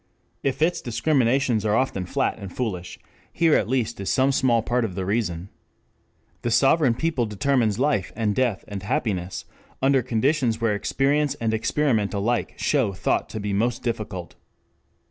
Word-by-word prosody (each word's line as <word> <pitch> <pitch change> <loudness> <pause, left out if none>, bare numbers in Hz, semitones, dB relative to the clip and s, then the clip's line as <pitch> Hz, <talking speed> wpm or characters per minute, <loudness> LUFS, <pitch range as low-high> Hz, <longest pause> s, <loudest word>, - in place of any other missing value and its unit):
If 135 +2 0
its 175 +2 +1
discriminations 125 -2 +1
are 105 -1 +2
often 105 -7 0
flat - - -1
and 100 -2 -7
foolish, 95 -8 -4 0.3
here 165 -2 +3
at - - +2
least 120 -4 -1
is 100 - -3
some 135 +1 +3
small 120 -4 +2
part 120 +1 0
of 100 -6 -3
the 95 -1 -3
reason. 95 -4 -2 0.9
The 120 - -1
sovereign 135 +1 +4
people 135 -5 0
determines 110 0 +1
life 135 -7 0
and 105 -2 0
death 120 -4 0
and 100 -2 -6
happiness 95 -4 -2 0.3
under 135 0 +3
conditions 125 0 +1
where 115 -2 +1
experience 140 +7 +1
and 115 -1 -1
experiment 110 -3 0
alike 115 +4 -1
show 130 -9 +1
thought - - -1
to 110 - -5
be 100 -1 -3
most 115 +4 0
difficult. 105 -7 -4
115 Hz, 160 wpm, -24 LUFS, 105-135 Hz, 0.9 s, sovereign